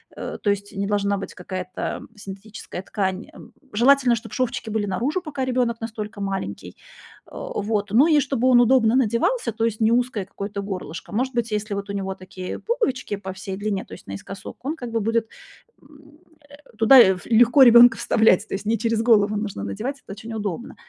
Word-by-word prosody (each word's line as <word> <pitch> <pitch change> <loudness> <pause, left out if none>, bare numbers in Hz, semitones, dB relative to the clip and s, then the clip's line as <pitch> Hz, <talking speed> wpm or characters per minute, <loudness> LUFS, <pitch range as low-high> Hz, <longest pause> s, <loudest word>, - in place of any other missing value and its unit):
Э, - - -6
то 205 - +2
есть 200 0 -5
не 195 0 -2
должна 200 -1 0
быть 195 - -7
какая-то 185 0 -5
синтетическая 200 -1 -9
ткань. 190 0 -3
Эм, 235 - -14 0.2
желательно, 255 +2 +4
чтоб 225 -1 -8
шовчики 245 -2 -2
были 210 -1 -1
наружу, 260 - -1
пока 285 -6 -4
ребёнок 245 -3 -1
настолько 215 -2 -6
маленький. 190 - -5 0.5
Э, - - -20 0.3
вот. 210 -1 -2
Ну 260 +8 +5
и 310 -3 +5
чтобы 260 -2 0
он 245 - +6
удобно 240 -2 +4
надевался, 240 - +1
то 225 0 -1
есть 225 -1 -2
не 220 +1 +4
узкое 240 -4 0
какое-то 200 +1 -6
горлышко. 185 -4 -7
Может 255 +3 -1
быть, 235 -1 -1
если 210 -1 -2
вот 200 0 -5
у 200 - -3
него 195 -1 -3
такие 185 0 -7
пуговички 265 - -2
по 190 -1 -7
всей 190 0 -6
длине, 205 -1 -3
то - - -13
есть - - -12
наискосок, 140 - -8
он 300 +4 -2
как 245 -7 -7
бы 230 - 0
будет, 225 +1 0 0.5
м, 295 +1 -19 0.3
э, 285 - -13 0.2
туда 225 +4 +7
ф 190 -5 +5
легко 240 +4 +6
ребёнка 240 0 +8
вставлять. 220 -2 +3
То - - -4
есть 200 - -6
не 225 +2 +1
через 230 -1 0
голову 210 -3 +4
нужно 205 - -4
надевать, 250 - -5
это - - -12
очень 220 +3 -9
удобно. 210 0 -5
220 Hz, 195 wpm, -23 LUFS, 200-245 Hz, 0.5 s, ребёнка